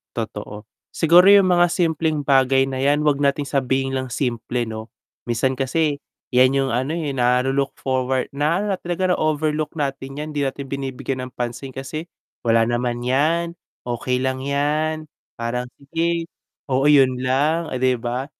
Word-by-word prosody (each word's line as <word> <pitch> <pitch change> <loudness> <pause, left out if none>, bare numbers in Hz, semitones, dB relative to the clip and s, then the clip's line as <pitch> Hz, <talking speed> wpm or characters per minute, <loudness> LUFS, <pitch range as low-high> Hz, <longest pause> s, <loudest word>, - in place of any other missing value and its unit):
Totoo. 105 -2 -6 0.2
Siguro 175 +4 +5
'yung 200 -1 +7
mga 175 0 +4
simpleng 160 -3 0
bagay 135 -1 +4
na 130 -1 -4
'yan 145 +2 +2
'wag 145 -1 +2
nating 140 0 +1
sabihin 135 -1 0
lang 130 -1 -2
simple 120 -1 -2
'no. 110 0 -7 0.4
Minsan 130 +3 +1
kasi, 145 +2 0 0.3
'yan 130 +2 +5
'yung 135 -2 0
ano, 130 +7 -1
eh, 150 -4 -2
nalu 125 +1 +2
look 140 0 -1
forward 130 0 0
na 170 +8 0
talaga 180 +1 0
na - - -1
overlook 155 0 0
natin 135 -1 -3
'yan, 150 - -4
hindi 145 - -1
natin 140 0 -2
binibigyan 135 -1 -4
ng - - -31
pansin 120 +2 -4
kasi, 145 +6 -6 0.3
wala 115 -1 +3
naman 120 0 -1
'yan, 160 +6 +1 0.3
okey 125 +1 -1
lang 130 0 -1
,yan. 150 +3 -1 0.3
Parang 125 +1 -3
sige, 165 +4 -1 0.4
oo 135 +1 +2
'yun 130 -3 +4
lang, 150 +6 +1
eh, 130 - -3
'di 130 0 +2
ba? 125 +2 -2
135 Hz, 160 wpm, -21 LUFS, 125-155 Hz, 0.4 s, yung